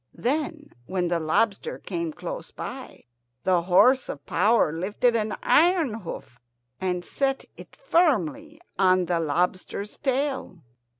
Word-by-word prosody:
Then, 295 Hz, +3 st, -2 dB, 0.2 s
when 180 Hz, -2 st, -1 dB
the 170 Hz, -1 st, +1 dB
lobster 200 Hz, -, 0 dB
came 335 Hz, -1 st, -4 dB
close -, -, -7 dB
by, 260 Hz, 0 st, -8 dB, 0.4 s
the 180 Hz, -2 st, +3 dB
horse 200 Hz, +10 st, +4 dB
of 145 Hz, -, -7 dB
power 205 Hz, -3 st, +3 dB
lifted 205 Hz, +8 st, +1 dB
an 215 Hz, -1 st, -1 dB
iron 330 Hz, -, +4 dB
hoof 170 Hz, -, -8 dB, 0.4 s
and 180 Hz, -1 st, -2 dB
set 270 Hz, -1 st, -1 dB
it -, -, -13 dB
firmly 300 Hz, -, +1 dB, 0.2 s
on 185 Hz, -1 st, +4 dB
the 175 Hz, -1 st, 0 dB
lobster's 180 Hz, +5 st, -2 dB
tail. 265 Hz, -, -2 dB
210 Hz, 125 wpm, -25 LUFS, 180-285 Hz, 0.4 s, horse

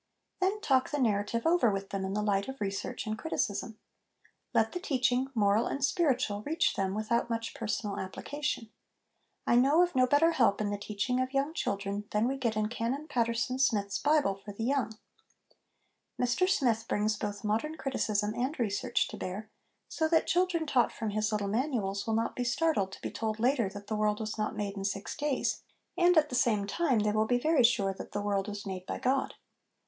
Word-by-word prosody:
Then, 385 Hz, +3 st, +1 dB
talk 265 Hz, -9 st, +2 dB
the 295 Hz, -, -2 dB
narrative 225 Hz, -1 st, 0 dB
over 330 Hz, -7 st, +4 dB
with 195 Hz, -1 st, -3 dB
them 195 Hz, -1 st, -2 dB
in 190 Hz, +1 st, -3 dB
the 210 Hz, -, 0 dB
light 200 Hz, -1 st, +1 dB
of 265 Hz, 0 st, -7 dB
research 200 Hz, +2 st, -3 dB
and 215 Hz, 0 st, -2 dB
criticism. 215 Hz, -4 st, -2 dB, 0.7 s
Let -, -, +2 dB
the 360 Hz, -, -4 dB
teaching, 255 Hz, -5 st, +1 dB
moral 210 Hz, +1 st, +3 dB
and 275 Hz, 0 st, 0 dB
spiritual, 260 Hz, -, +1 dB
reach 320 Hz, +8 st, +1 dB
them 195 Hz, 0 st, -1 dB
without 235 Hz, +3 st, 0 dB
much 230 Hz, -1 st, -3 dB
personal 210 Hz, -2 st, -3 dB
application. 235 Hz, +3 st, -4 dB, 0.7 s
I 240 Hz, -, +4 dB
know 285 Hz, +7 st, +5 dB
of 355 Hz, -, -1 dB
no 255 Hz, -1 st, +4 dB
better 290 Hz, +5 st, +4 dB
help 235 Hz, -10 st, +3 dB
in 210 Hz, -1 st, -1 dB
the 205 Hz, -, -2 dB
teaching 210 Hz, +5 st, -1 dB
of 255 Hz, +1 st, -3 dB
young 280 Hz, +3 st, +1 dB
children 200 Hz, -, -2 dB
than 210 Hz, +3 st, +1 dB
we 270 Hz, -, 0 dB
get 230 Hz, -5 st, -1 dB
in 215 Hz, 0 st, +1 dB
Canon 245 Hz, +6 st, -3 dB
Paterson 235 Hz, -1 st, 0 dB
Smyth's 205 Hz, -6 st, +1 dB
Bible 290 Hz, -7 st, +3 dB
for 195 Hz, +2 st, -10 dB
the 225 Hz, +3 st, -3 dB
252 270 Hz, -, +2 dB, 1.4 s
HOME -, -, -1 dB
EDUCATION 245 Hz, +7 st, 0 dB
Young. 365 Hz, -, +5 dB
Mr -, -, 0 dB, 0.3 s
Smyth 225 Hz, -, -14 dB
brings 210 Hz, +1 st, +1 dB
both 205 Hz, -1 st, -4 dB
modern 225 Hz, +10 st, -1 dB
criticism 215 Hz, -6 st, -1 dB
and 260 Hz, +7 st, -2 dB
research 235 Hz, +2 st, 0 dB
to -, -, -7 dB
bear, 205 Hz, +4 st, -5 dB, 0.4 s
so 320 Hz, -, 0 dB
that 325 Hz, 0 st, +3 dB
children 355 Hz, -2 st, +1 dB
taught 255 Hz, -5 st, +2 dB
from 220 Hz, -2 st, -4 dB
his 215 Hz, +1 st, 0 dB
little 210 Hz, -1 st, -1 dB
manuals 210 Hz, -4 st, -1 dB
will 225 Hz, -, +1 dB
not 225 Hz, +1 st, -1 dB
be 250 Hz, -, -1 dB
startled 240 Hz, -5 st, +1 dB
to -, -, -10 dB
be -, -, -3 dB
told 220 Hz, -1 st, -3 dB
later 240 Hz, -3 st, +2 dB
that 205 Hz, +1 st, -9 dB
the 215 Hz, -, -3 dB
world 210 Hz, 0 st, +1 dB
was 215 Hz, -1 st, -3 dB
not 215 Hz, 0 st, -2 dB
made 205 Hz, -1 st, -3 dB
in 195 Hz, -, -5 dB
six 200 Hz, 0 st, -3 dB
days; 295 Hz, -3 st, -1 dB, 0.3 s
and, 355 Hz, -1 st, +4 dB
at 305 Hz, -1 st, +4 dB
the -, -, -8 dB
same 235 Hz, -5 st, +2 dB
time, 270 Hz, +4 st, +1 dB
they 210 Hz, 0 st, +2 dB
will 215 Hz, +1 st, +1 dB
be 245 Hz, -, +3 dB
very 300 Hz, +1 st, +3 dB
sure 200 Hz, -5 st, +3 dB
that -, -, -9 dB
the 205 Hz, -, -1 dB
world 200 Hz, -1 st, 0 dB
was 205 Hz, 0 st, -6 dB
made 185 Hz, -1 st, -6 dB
by -, -, -3 dB
God. 265 Hz, +1 st, 0 dB
225 Hz, 210 wpm, -30 LUFS, 205-270 Hz, 1.4 s, know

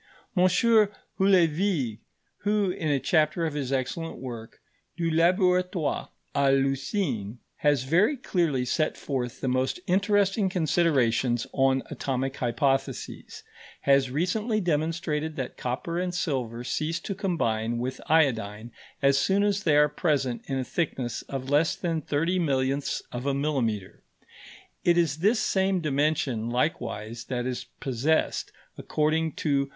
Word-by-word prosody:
M. 180 Hz, -1 st, +4 dB
Houllevigue, 190 Hz, -, +2 dB, 0.4 s
who, 205 Hz, -2 st, +1 dB
in 180 Hz, -4 st, -3 dB
a 140 Hz, -2 st, +2 dB
chapter 160 Hz, +2 st, +2 dB
of 155 Hz, -, -2 dB
his 140 Hz, -3 st, -3 dB
excellent 135 Hz, +5 st, -2 dB
work, 115 Hz, -3 st, -8 dB, 0.4 s
Du 165 Hz, -1 st, 0 dB
Laboratoire 180 Hz, -1 st, +2 dB, 0.2 s
à 140 Hz, -1 st, +3 dB
l'Usine, 135 Hz, -, 0 dB, 0.2 s
has 145 Hz, -4 st, +2 dB
very 180 Hz, -, +3 dB
clearly 165 Hz, -, 0 dB
set 155 Hz, +5 st, 0 dB
forth 125 Hz, -4 st, -4 dB
the -, -, -1 dB
most 130 Hz, +5 st, 0 dB
interesting 195 Hz, +1 st, +2 dB
considerations 135 Hz, -9 st, +2 dB
on 135 Hz, 0 st, +2 dB
atomic 135 Hz, 0 st, -2 dB
hypotheses, 135 Hz, +2 st, -2 dB, 0.4 s
has 135 Hz, -1 st, +3 dB
recently 210 Hz, -, 0 dB
demonstrated 160 Hz, -2 st, -1 dB
that 130 Hz, -2 st, -4 dB
copper 135 Hz, +8 st, -3 dB
and 180 Hz, -1 st, -2 dB
silver 125 Hz, -9 st, -2 dB
cease 155 Hz, +6 st, -2 dB
to 200 Hz, -, -4 dB
combine 120 Hz, -, -1 dB
with 130 Hz, +2 st, -4 dB
iodine 115 Hz, -8 st, +1 dB, 0.3 s
as 140 Hz, 0 st, +4 dB
soon 195 Hz, +7 st, +2 dB
as 205 Hz, -1 st, +1 dB
they 155 Hz, -7 st, +3 dB
are 150 Hz, 0 st, +6 dB
present 145 Hz, -5 st, 0 dB
in 135 Hz, -, -1 dB
a 130 Hz, -, -1 dB
thickness 130 Hz, -5 st, -2 dB
of 135 Hz, 0 st, -4 dB
less 150 Hz, +3 st, +3 dB
than 165 Hz, -3 st, -2 dB
thirty 165 Hz, +6 st, 0 dB
millionths 135 Hz, -3 st, 0 dB
of 125 Hz, +3 st, -4 dB
a 140 Hz, -, +1 dB
millimetre. 125 Hz, -9 st, -2 dB, 0.8 s
It 175 Hz, 0 st, +4 dB
is 160 Hz, -4 st, +2 dB
this 215 Hz, +6 st, +3 dB
same 190 Hz, -2 st, +1 dB
dimension 145 Hz, -6 st, 0 dB
likewise 120 Hz, -3 st, -2 dB
that 125 Hz, -2 st, -3 dB
is 125 Hz, -1 st, -3 dB
possessed, 135 Hz, +5 st, 0 dB, 0.3 s
according 155 Hz, +1 st, 0 dB
to 140 Hz, -3 st, +1 dB
M. -, -, -18 dB
145 Hz, 135 wpm, -27 LUFS, 130-175 Hz, 0.8 s, are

